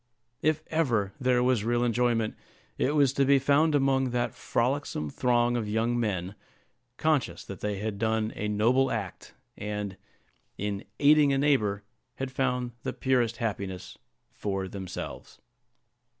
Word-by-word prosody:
If 155 0 +1
ever 120 -12 +1
there 125 -2 +2
was 125 -4 +2
real 120 +1 +1
enjoyment, 120 -2 +1 0.4
it 145 - 0
was 140 -3 +4
to 140 - +2
be 140 +1 +5
found 145 +3 +3
among 135 -2 +2
that 120 0 -1
frolicsome 120 - -1
throng 120 - +2
of 110 -3 -2
young 115 +3 +1
men, 95 -5 -1 0.6
conscious 155 -4 0
that 100 - -8
they 105 -1 -2
had 105 0 -4
done 110 0 0
a 105 - -2
noble 120 +6 +3
act, 100 -6 -5 0.2
and, 105 -1 -4 0.6
in 100 -1 -3
aiding 145 -1 +5
a - - +2
neighbor, 110 -9 +2 0.3
had 135 -1 -4
found 125 -2 -1
the - - -3
purest 125 -3 +1
happiness 100 -4 -4 0.4
for 95 -2 -3
themselves. 95 -1 -7
120 Hz, 140 wpm, -28 LUFS, 105-135 Hz, 0.6 s, be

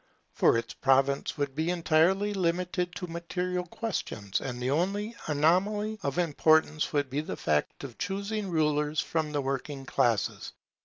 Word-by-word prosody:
For - - +4
its 115 0 -4
province 135 +2 +2
would 140 -2 -1
be 160 +4 -1
entirely 180 +4 +2
limited 180 -1 -1
to 180 - -4
material 180 +1 -3
questions, 155 - -3
and 125 -2 -4
the 125 +1 -1
only 200 +8 0
anomaly 195 +8 +1
of 140 -1 -2
importance 155 -2 +3
would 145 -2 +1
be 145 +3 0
the 155 - -6
fact 75 - -1
of 130 -5 -8
choosing 200 +2 -2
rulers 150 -2 +1
from 160 -3 -1
the 145 -1 0
working 135 +1 -4
classes. 120 -6 0
160 Hz, 150 wpm, -29 LUFS, 140-180 Hz, -, For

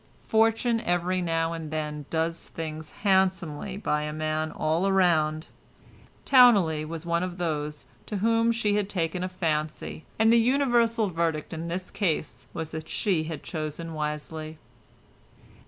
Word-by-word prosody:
Fortune 225 +1 +3
every 180 -2 0
now 165 -1 0
and 165 -2 -5
then 150 -2 -4
does 165 +1 -1
things 155 -1 -6
handsomely 190 -2 +1
by 150 -7 0
a 150 0 -3
man 155 0 -2
all 170 +5 +1
round; 160 -5 +2 0.8
Towneley 200 - +6
was 160 +1 -6
one 170 0 +1
of 180 -1 -4
those 150 -4 -3 0.2
to 210 - -3
whom 230 +3 +3
she 225 -3 +1
had 205 -1 -1
taken 180 -1 -1
a 185 - -2
fancy, 155 -3 -2
and 220 +1 +5
the - - +6
universal 235 -3 +3
verdict 165 -2 -1
in 165 +1 -4
this 180 +2 -4
case 170 -6 -2
was 160 -1 -5
that 160 0 -6
she 180 -7 0
had 155 -2 -6
chosen 160 +1 -5
wisely. 155 +1 -4
165 Hz, 145 wpm, -27 LUFS, 155-195 Hz, 0.8 s, Towneley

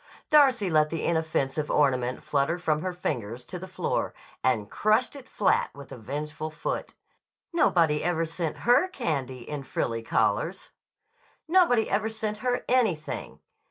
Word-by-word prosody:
Darcy 265 -9 +5
let 155 -3 +3
the 165 0 -3
inoffensive 155 -3 0
ornament 130 -3 +1
flutter 145 +4 +1
from 155 -3 0
her 185 - -2
fingers 125 - -4
to 180 - -7
the 185 - -8
floor - - -2 0.3
and 115 -5 +1
crushed 215 - +1
it 275 -2 -11
flat 205 - +2
with 140 0 -11
a - - -6
vengeful 150 +6 -5
foot. 155 - -4 0.6
Nobody 165 - +3
ever 165 -1 +1
sent 165 0 -3
her 245 +10 +5
candy 140 - -3
in 150 -1 -4
frilly 115 -3 -2
collars! 115 - 0 0.8
Nobody 320 -11 +4
ever 215 +2 0
sent 220 -1 -4
her 245 +2 -1
anything! 215 -12 0
160 Hz, 145 wpm, -27 LUFS, 140-215 Hz, 0.8 s, Darcy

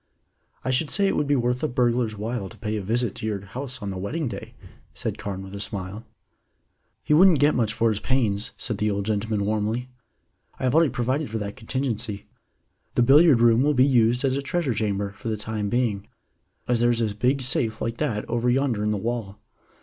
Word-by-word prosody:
"I 130 - +1
should 140 +4 +1
say 200 +1 +2
it 195 - +1
would 150 - 0
be 145 - +3
worth 125 0 0
a 155 - +1
burglar's 120 -4 0
while 110 -1 -3
to 110 - -14
pay 105 +1 -3
a 105 - -2
visit 115 +2 0
to - - -6
your 100 -2 -3
house 125 +2 -6
on 100 - -3
the 95 - -5
wedding 145 - -2
day," - - -7 0.4
said - - -3
Carne 95 -1 -5
with 95 0 -10
a 100 - -6
smile. 100 +2 -5 1.0
"He - - +1
wouldn't 175 +1 +7
get 145 +2 +4
much 115 -3 +1
for 115 +1 +1
his 105 -2 -1
pains," 110 -5 0
said 110 -4 -3
the 105 - +1
old 100 -1 -2
gentleman 105 -1 -1
warmly. 110 +4 -1 0.7
"I - - -6
have 130 -1 +2
already 160 -1 +5
provided 130 +4 -1
for 110 - -3
that 105 -1 -5
contingency. 115 -4 -3 0.7
The 120 - +4
billiard 140 0 +6
room 120 0 +5
will 145 +1 +2
be 130 +1 +5
used 125 -1 +3
as 130 -1 +1
a 140 - -1
treasure 140 -1 -1
chamber 100 -2 -1
for - - -7
the 110 -1 -1
time 105 -1 -3
being, 110 -4 0 0.6
as 120 -1 +2
there 120 +1 +3
is 120 -1 +1
a 110 -2 0
big 130 +6 +1
safe 120 -3 +1
like 115 +1 -3
that 115 -9 -2
over 120 +1 0
yonder 125 -4 +1
in 105 - 0
the 105 - 0
wall. 110 -2 -3
115 Hz, 220 wpm, -24 LUFS, 105-130 Hz, 1.0 s, wouldn't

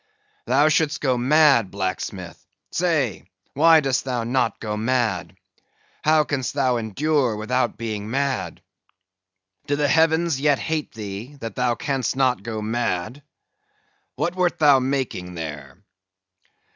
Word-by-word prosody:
Thou 135 +5 +4
should'st 155 -1 +1
go 130 -3 +1
mad, 135 -3 +4
blacksmith; 95 -1 -5 0.3
say, 155 - -1 0.2
why 160 +2 +6
dost 135 -3 0
thou 125 -3 -2
not 120 -2 0
go 105 -1 -3
mad? 115 -3 -1 0.7
How 155 0 +4
can'st 140 -3 -3
thou 130 -3 +2
endure 125 +3 0
without 120 +2 -1
being 110 -2 -4
mad? 135 +1 -2 1.0
Do 145 - +1
the 145 0 +1
heavens 160 -1 +2
yet 145 -1 +3
hate 155 +1 -3
thee, 110 +5 -7
that 115 -3 -6
thou 125 -1 +1
can'st 135 -2 -2
not 130 -5 +1
go 110 0 -5
mad?—What 120 - -5
wert 180 -1 +1
thou 145 -3 +5
making 130 -9 -3
there?" 75 -2 -7
130 Hz, 125 wpm, -23 LUFS, 110-145 Hz, 1.0 s, why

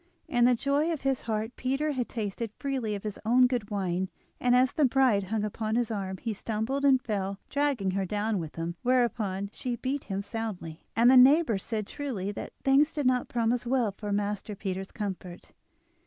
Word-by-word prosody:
In 240 -1 +3
the 250 0 +5
joy 285 +6 +1
of 320 - -3
his 270 -1 0
heart 220 +2 -2
Peter 275 +4 -1
had 255 -4 -2
tasted 220 0 -3
freely 260 -7 -2
of 200 - -7
his 210 -2 -5
own 245 +3 +5
good 245 -5 -1
wine, 190 -2 -1 0.3
and 245 0 +3
as 255 +1 +4
the 305 - +2
bride 255 -6 +3
hung 210 +2 -1
upon 215 +1 -2
his 235 -1 0
arm 190 -3 -3
he 225 +3 -3
stumbled 225 +7 -2
and 270 -2 +5
fell, 200 -4 -3
dragging 280 -9 +1
her 195 +1 0
down 210 +1 -1
with 160 -3 -6
him; 165 +1 -3
whereupon 220 -6 +1
she 245 -2 -3
beat 265 +4 -3
him 195 0 -3
soundly, 200 -8 -6
and 235 +2 +6
the 260 - +7
neighbours 255 - +6
said 215 -2 -2
truly 215 -8 -4
that 205 - -6
things 280 +3 +4
did 295 -3 -1
not 250 -1 +2
promise 235 0 +1
well 245 -4 +2
for 205 +1 -6
Master 205 +1 -2
Peter's 190 -1 -4
comfort. 190 -4 -6
225 Hz, 195 wpm, -28 LUFS, 200-255 Hz, 0.3 s, the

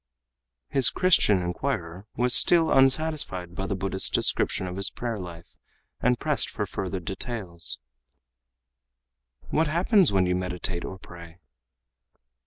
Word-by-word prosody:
His 135 -2 +4
Christian 130 - +3
inquirer 90 -1 -4 0.2
still 165 +6 +5
was - - +1
unsatisfied 135 - +1
by 95 +2 -4
the 100 - -2
Buddhist's 95 0 -1
description 95 - +1
of 90 0 -6
his 100 +1 -2
prayer 115 -3 -5
life, 85 -2 -10 0.5
and 125 0 +2
pressed - - +1
further - - -4
for 95 -1 -4
details. 90 - -5 1.7
"What 160 +1 +2
happens 175 - +3
when 95 -2 +2
you 90 - 0
meditate 90 -1 -3
or 95 - -7
pray?" 85 -2 -13
95 Hz, 125 wpm, -25 LUFS, 90-135 Hz, 1.7 s, still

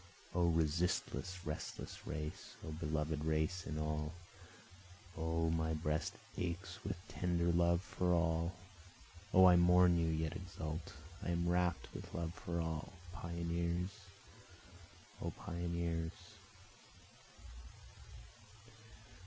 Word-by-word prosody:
O 85 -1 +4
resistless 85 +3 +1
restless 75 0 -5
race! 75 0 -5
O - - -3
beloved 75 -1 -1
race 80 +3 +1
in 75 - -2
all! 75 0 -1 1.0
O 80 0 +1
my 80 -1 +1
breast 75 0 0 0.3
aches 90 +2 -3
with - - -2
tender 85 +2 +1
love 85 +1 +4
for 90 -2 0
all! 85 0 +2 0.8
O 95 -1 +8
I 90 -1 +9
mourn 90 0 +6
and 80 -1 +2
yet 80 0 -1
exult, 85 -2 -5 0.3
I - - -3
am 85 0 +1
rapt 90 -1 +2
with - - -7
love 85 0 -2
for 85 -1 -3
all, 80 -1 -2 0.2
Pioneers! 85 +1 -1 1.3
O - - -1
pioneers! 85 -1 -2
85 Hz, 105 wpm, -38 LUFS, 80-85 Hz, 1.3 s, I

